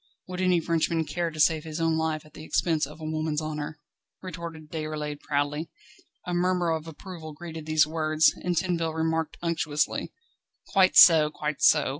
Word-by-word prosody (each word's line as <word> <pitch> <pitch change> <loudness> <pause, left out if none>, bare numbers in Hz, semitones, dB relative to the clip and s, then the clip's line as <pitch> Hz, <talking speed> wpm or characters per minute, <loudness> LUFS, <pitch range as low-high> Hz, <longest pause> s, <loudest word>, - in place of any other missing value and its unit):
"Would 185 0 -5
any 180 -2 +3
Frenchman 165 0 0
care 170 +2 -2
to 155 -1 -10
save 155 +1 +3
his 160 0 -6
own 165 -1 +1
life 160 -1 -1
at 155 - -18
the 155 - -10
expense 160 -2 0
of 150 +2 -12
a - - -10
woman's 155 -1 -1
honour?" 155 0 -5 0.5
retorted 165 -3 -8
Déroulède 155 -2 -4
proudly. 145 +2 -2 0.6
A 180 - -3
murmur 175 -1 +1
of 160 0 -3
approval 160 -1 -9
greeted 160 0 -8
these 155 -1 +4
words, 155 0 +2
and 180 -1 -1
Tinville 165 -2 0
remarked 160 0 -1
unctuously: 155 -3 -1 0.6
"Quite 190 -2 +4
so, 160 -3 +8
quite 150 -1 -4
so. 150 -2 +5
160 Hz, 170 wpm, -26 LUFS, 155-170 Hz, 0.6 s, so